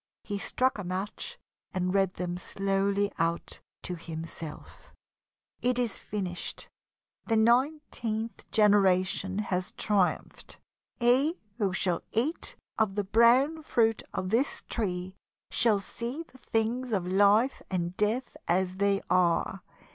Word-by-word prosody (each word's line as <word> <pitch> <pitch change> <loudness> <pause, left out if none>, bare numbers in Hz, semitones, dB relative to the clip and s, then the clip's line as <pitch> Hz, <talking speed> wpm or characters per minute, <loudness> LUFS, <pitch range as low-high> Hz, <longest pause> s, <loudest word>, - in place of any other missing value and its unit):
He 205 -1 -3
struck 255 +2 0
a - - -3
match 195 - -4 0.4
and 180 0 0
read 195 -2 +2
them 175 -1 -3
slowly 195 +2 0
out 165 0 -1 0.2
to 180 - -3
himself: 165 -2 -8 0.7
"It 250 0 +2
is 240 -4 0
finished. 185 -4 -4 0.6
The 225 - +3
nineteenth 235 -3 +1
generation 195 -2 +3
has 185 -3 -2
triumphed. 200 -4 -1 0.4
He 265 +8 +3 0.2
who 200 -3 +2
shall 180 -2 0
eat 275 +9 -1 0.2
of 215 -3 +2
the 205 - +1
brown 240 +10 +4
fruit 225 -6 +2
of 185 - -3
this 250 +6 +1
tree 185 -4 -2 0.4
shall 220 -4 +3
see 235 +9 -5
the 260 -5 -20
things 235 +3 -1
of 190 -4 +1
Life 205 +7 +4
and 175 -1 -2
Death 220 +6 0
as 185 +1 +1
they 200 0 +2
are. 180 +1 +2
205 Hz, 125 wpm, -29 LUFS, 185-235 Hz, 0.7 s, brown